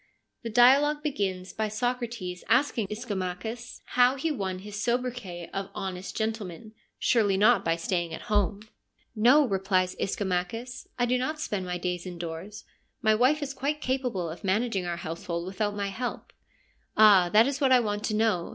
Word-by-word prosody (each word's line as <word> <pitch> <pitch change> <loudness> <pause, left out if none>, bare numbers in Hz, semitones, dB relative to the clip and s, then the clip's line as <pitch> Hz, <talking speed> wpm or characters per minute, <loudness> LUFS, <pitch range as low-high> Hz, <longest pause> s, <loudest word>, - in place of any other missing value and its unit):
The 230 - -5
dialogue 275 +6 +5
begins 190 - -2
by 220 0 -1
Socrates 230 -5 -3
asking 245 -5 +2
Ischomachus 210 +2 -5
how 250 +1 +3
he 310 +4 -1
won 195 -9 -3
his 205 +2 -9
sobri 245 +3 0
quet 175 -8 -8
of 195 0 -2
• - - -25
honest 190 -1 -5
gentleman 220 -2 -4
' - - -38
— - - -54
surely 205 -5 +3
not 220 +5 +5
by 165 - +1
staying 170 0 -2
at - - -7
home! 205 0 0 0.3
' - - -41
No,' 250 +7 +6
replies 190 -2 +1
Ischomachus, 200 +6 -3
' - - -43
I 245 - +2
do 250 +1 +1
not 305 +5 -2
spend 205 -11 -3
my 180 0 -2
days 180 0 -3
indoors: 175 +3 -7 0.4
my 220 0 +5
wife 260 +7 +3
is 275 -1 -4
quite 285 +3 -2
capable 250 - -1
of 165 +5 -8
managing 195 -1 0
our 170 -1 -2
household 170 +1 -4
without 205 +2 -2
my 200 -1 -2
help.' 245 +5 -5 0.4
' - - -38 0.2
Ah, 200 -5 +7
that 215 +5 +6
is 275 +1 -2
what 270 -2 +3
I 255 - +7
want 210 -2 -2
to 215 - -1
know. 215 -6 +1
210 Hz, 190 wpm, -27 LUFS, 185-245 Hz, 0.4 s, Ah